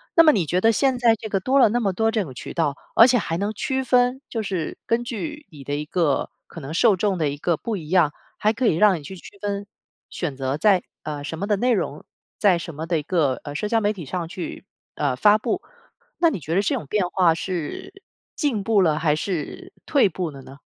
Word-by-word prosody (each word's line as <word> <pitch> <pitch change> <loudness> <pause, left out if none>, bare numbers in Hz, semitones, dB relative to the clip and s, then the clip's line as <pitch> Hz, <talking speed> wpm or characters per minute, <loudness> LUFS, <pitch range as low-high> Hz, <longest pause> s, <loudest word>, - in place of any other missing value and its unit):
那 330 - +8
么 310 - +7
你 190 - +1
觉 180 +5 0
得 225 - +5
现 260 +2 +2
在 230 -2 +5
这 220 - -7
个 195 - 0
多 265 +7 +3
了 250 - +7
那 240 - +1
么 200 -4 +1
多 225 +4 +1
这 220 -3 0
种 135 -6 -9
渠 125 - -8
道， 155 -5 0 0.2
而 230 - +9
且 250 - +4
还 165 -7 -2
能 205 +2 -1
区 265 +5 -2
分 250 +1 +2
就 225 - -2
是 185 -6 -3
根 230 +1 +1
据 295 +6 -5
你 145 -3 -11
的 145 +2 -4
一 150 +1 -3
个 155 -4 0 0.2
可 165 - -10
能 145 +2 -7
受 205 +2 +4
众 200 -1 0
的 155 -4 +1
一 145 - -5
个 170 +3 0
不 220 +6 -4
一 155 -4 -8
样， 175 -4 +4 0.3
还 215 - +2
可 230 +2 0
以 - - +3
让 195 -2 +4
你 - - -13
去 190 +7 -8
区 190 +2 -13
分、 200 -1 -3 0.4
选 150 -7 -4
择 135 +1 -2
在， 190 +2 +3 0.2
呃， 150 -2 -5
什 160 +2 -5
么 200 - -2
的 210 - +2
内 245 +5 +1
容 215 - -1 0.3
在 190 -5 +4
什 165 -2 -7
么 160 +2 -5
的 165 -2 0
一 - - -4
个， 150 -6 +1
呃， 145 - -6
社 210 +7 -2
交 225 - +3
媒 210 -1 +1
体 185 -5 -8
上 170 +4 -4
去， 180 +2 -7 0.3
呃， 140 -4 0
发 210 +10 +5
布。 375 - -2 0.6
那 335 - +4
你 275 - -4
觉 160 - -4
得 195 - +4
这 205 - 0
种 150 - -5
变 195 -1 0
化 180 -4 +3
是 180 - -5 0.3
进 270 -10 -1
步 210 -1 +3
了， 155 -4 +2
还 150 -2 +2
是 165 -1 -4
退 275 -10 +3
步 175 0 -3
了 140 -2 -10
呢？ 135 +1 -13
190 Hz, 270 characters per minute, -23 LUFS, 155-225 Hz, 0.6 s, 而